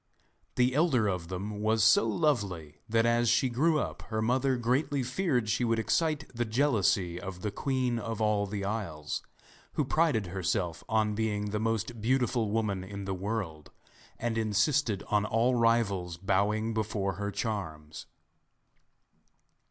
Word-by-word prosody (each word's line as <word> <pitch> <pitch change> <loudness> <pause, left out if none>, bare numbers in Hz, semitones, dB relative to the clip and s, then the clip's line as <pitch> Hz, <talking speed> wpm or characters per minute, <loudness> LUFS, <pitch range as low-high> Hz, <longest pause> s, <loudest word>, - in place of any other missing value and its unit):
The 125 0 +3
elder 135 -7 +3
of 90 -4 -2
them 100 +3 -5
was 110 0 +2
so 110 +1 +5
lovely 100 - -1
that 115 +1 +3
as 115 0 +3
she 130 - +3
grew 155 +7 +2
up - - -4
her 110 -1 -1
mother 130 +4 +1
greatly 130 +3 0
feared 130 - 0
she 120 +4 +1
would 115 -1 +2
excite 150 +7 0
the 120 0 -1
jealousy 110 - +1
of 95 -2 -7
the 105 - -1
Queen 125 0 -1
of 115 -1 -4
all 105 -2 +1
the 100 0 -4
Isles, 95 -8 -3 0.5
who 150 - 0
prided 150 -8 +2
herself 90 -3 -1
on 110 -1 +2
being 105 -1 -1
the 105 - -1
most 115 +1 -2
beautiful 120 -2 +1
woman 105 -3 -1
in 100 +1 -7
the 95 - -2
world, 95 -6 -4 0.5
and 115 -1 -1
insisted 110 +1 +1
on 105 -1 +2
all 115 +4 +2
rivals 110 -7 +1
bowing 100 +4 +1
before 105 -3 -1
her 100 - -1
charms. 80 -9 -5
110 Hz, 150 wpm, -30 LUFS, 100-120 Hz, 0.5 s, so